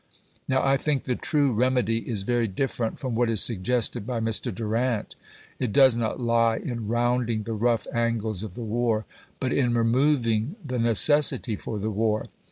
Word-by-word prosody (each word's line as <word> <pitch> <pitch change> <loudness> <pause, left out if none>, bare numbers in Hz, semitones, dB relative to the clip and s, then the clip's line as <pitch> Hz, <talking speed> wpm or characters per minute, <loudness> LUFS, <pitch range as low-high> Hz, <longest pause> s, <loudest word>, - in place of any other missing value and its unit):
Now, 130 +1 +1
I 135 0 +3
think 140 -1 -1
the 125 - -1
true 145 +2 +1
remedy 125 -1 +1
chap. - - -10
viii. - - -3
is 100 -4 0
very 120 +1 0
different 115 +2 -3
from 130 -3 -4
what 120 +1 +1
is 110 -3 +2
suggested 115 +1 +1
by 125 -2 -2
Mr. 115 +2 0
Durant. 115 +3 -2 0.4
It 125 -4 -1
does 130 0 +6
not 115 +1 -2
lie 115 -1 +2
in 115 -4 -5
rounding 120 -1 0
the 115 - -4
rough 115 +1 0
angles 115 -4 -1
of 105 -4 -7
the 120 - -6
war, 110 -1 -1 0.3
but 130 - -1
in 125 -3 +1
removing 120 - +1
the 125 -3 -3
necessity 115 +2 +3
for 105 - -6
the 105 +2 -3
war. 110 +1 -1
115 Hz, 180 wpm, -25 LUFS, 110-125 Hz, 0.4 s, does